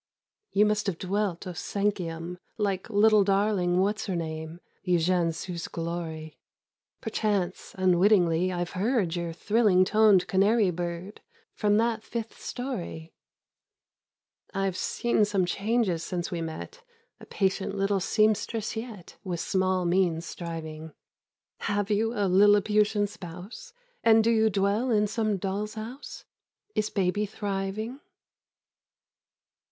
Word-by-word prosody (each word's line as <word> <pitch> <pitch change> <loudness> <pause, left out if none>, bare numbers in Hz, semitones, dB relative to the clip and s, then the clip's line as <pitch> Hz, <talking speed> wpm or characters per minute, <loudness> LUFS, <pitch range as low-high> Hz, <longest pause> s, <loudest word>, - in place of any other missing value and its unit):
You 205 +2 +4
must 210 0 0
have 185 -4 -1
dwelt 195 -1 -2
au 185 - -4
cinquième, 180 -2 -3 0.2
Like 200 -3 -1
little 215 0 +5
darling 195 -2 +2
What's 210 +3 0
her 190 - -1
name,— 160 0 -5 0.3
Eugène 175 -1 +2
Sue's 170 +1 -5
glory: 165 -2 -5 0.6
Perchance, 205 -4 -2
unwittingly, 185 -1 +3
I've 175 -1 -3
heard 195 -3 0
Your 170 -1 -3
thrilling 195 +1 +3
toned 210 -2 +5
Canary 200 +1 +3
bird 175 +3 -5 0.3
From 210 0 +2
that 230 0 +1
fifth 230 -1 -6
storey. 185 -10 -5 1.4
I've 195 -1 0
seen 235 +3 +1
some 200 -3 +1
changes 200 -2 0
since 175 -2 -3
we 170 -2 -2
met; 165 - -7 0.4
A - - -12
patient 195 0 -1
little 195 0 +1
seamstress 215 +3 +1
yet, 220 -6 -8
With 180 -3 -3
small 185 0 0
means 175 -2 +1
striving, 160 -2 -7 0.7
Have 205 -1 -1
you 220 +2 +2
a 205 - +1
Lilliputian 205 +2 +4
spouse? 200 - -9 0.3
And 225 -1 +6
do 230 - +3
you 220 -1 +4
dwell 200 +5 +1
in 210 -3 +3
some 215 -1 0
doll's 200 +3 -3
house? 255 - -8 0.5
—Is 215 - 0
baby 200 +2 0
thriving? 205 +5 -4
195 Hz, 120 wpm, -27 LUFS, 175-215 Hz, 1.4 s, And